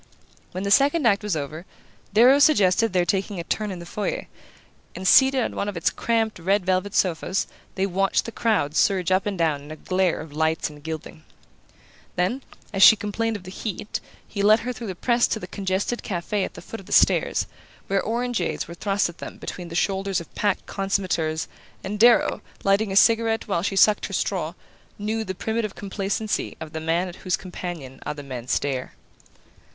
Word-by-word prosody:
When 185 - -4
the 200 - -1
second 285 +6 +4
act 200 -3 +4
was 210 -4 -1
over, 155 +2 -5 0.5
Darrow 250 +6 +6
suggested 225 - +4
their 180 -1 +2
taking 195 +2 -1
a - - -3
turn 210 +5 -2
in 190 - -5
the 170 - -9
foyer; 205 +4 -3 0.7
and 185 +1 -3
seated 265 +3 +6
on - - -3
one 205 - -1
of 200 - -5
its 165 - +1
cramped 225 -3 0
red 190 +3 +1
velvet 185 +2 0
sofas 185 +1 +1 0.3
they 190 - +1
watched 195 +1 +1
the 230 - -5
crowd 210 -12 0
surge 190 -2 +2
up 185 +2 +2
and 200 -2 -2
down 160 -4 +1
in 145 - -12
a 155 - -6
glare 185 +2 0
of 155 -2 -9
lights 160 0 0
and 150 -1 -14
gilding. 155 - -7 0.9
Then, 185 +10 0 0.3
as 195 - -1
she 220 - +10
complained 220 +2 -2
of 200 - -7
the 185 - -9
heat, 205 +1 -4 0.3
he 200 - -4
led 215 +2 +5
her 250 +1 -3
through 235 -1 -7
the 190 - -4
press 240 +5 +2
to 220 - -2
the - - -6
congested 195 +4 -2
cafe 190 +2 -2
at - - -5
the - - -10
foot 225 - -8
of 195 - -14
the - - -12
stairs, - - +3 0.4
where 195 -1 +1
orangeades 235 -5 -2
were 170 - -8
thrust 200 +3 0
at 170 - -11
them - - -8
between 180 - -7
the 170 - -8
shoulders 195 +1 0
of 170 - -12
packed 205 -2 0
consommateurs 185 -5 -1 0.4
and 205 +2 -4
Darrow, 240 +2 +5 0.2
lighting 200 +1 +2
a - - -2
cigarette 225 +1 +4
while 195 -5 0
she 195 +2 -2
sucked 210 +2 +4
her - - -9
straw, - - -1 0.4
knew 220 +1 -2
the 190 -3 -5
primitive 220 +1 -2
complacency 200 +2 -3
of 160 -1 -8
the 160 - -4
man 165 +3 0
at 175 - -9
whose 185 -2 -1
companion 175 -8 -7
other 145 -1 -5
men 125 -3 -7
stare. 130 -1 -1
195 Hz, 200 wpm, -24 LUFS, 170-215 Hz, 0.9 s, she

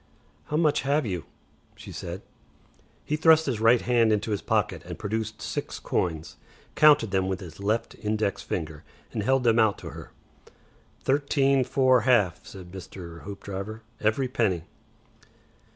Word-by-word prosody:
"How 150 - -2
much 155 -3 +3
have 145 +1 +1
you?" 90 -6 -3 0.5
she - - -11
said. - - -6 0.8
He 150 - 0
thrust 160 0 +5
his 125 -6 -1
right 115 +2 +5
hand 120 -2 +3
into 105 +1 0
his 105 - -1
pocket - - 0
and - - -7
produced 110 +1 -4
six - - -4
coins, 80 -3 -2 0.4
counted 145 -8 +5
them 95 -1 +1
with 95 -1 -2
his 80 -5 -10
left 105 +3 -1
index 105 -1 -1
finger, 80 -2 -5 0.3
and - - -2
held 130 +4 +2
them 115 -1 +4
out 110 -2 +3
to 80 - -8
her. 80 0 -10 0.9
"Thirteen 140 -1 +2
four 130 -1 +3
half," 110 -7 +2
said 90 -2 -11
Mr. 90 -3 -9
Hoopdriver. 100 +2 -6 0.2
"Every 110 +5 +1
penny." 110 -10 0
110 Hz, 150 wpm, -26 LUFS, 95-130 Hz, 0.9 s, thrust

